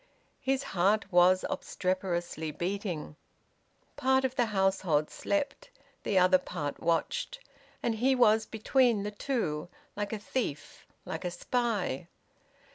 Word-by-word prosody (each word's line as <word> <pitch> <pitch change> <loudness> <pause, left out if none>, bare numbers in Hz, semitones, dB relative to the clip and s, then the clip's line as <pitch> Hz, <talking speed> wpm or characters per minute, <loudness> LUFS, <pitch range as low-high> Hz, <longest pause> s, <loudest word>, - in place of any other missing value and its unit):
His 270 0 0
heart 195 +4 +1
was 180 +1 +5
obstreperously 175 -4 -2
beating. 175 -2 -4 0.8
Part 265 -1 +3
of 260 - -1
the 245 -3 +1
household 190 -7 +1
slept; 285 -2 -2 0.3
the 195 - 0
other 185 0 +6
part 150 -6 -4
watched; 485 - 0 0.4
and 235 - +1
he 255 +4 +2
was 220 -3 +4
between 230 -1 +2
the 210 - -3
two, 200 - -2 0.3
like 205 0 -3
a 220 - -2
thief, 205 - -4 0.2
like 160 - -5
a 180 - -1
spy. 195 - -1
200 Hz, 120 wpm, -30 LUFS, 175-245 Hz, 0.8 s, other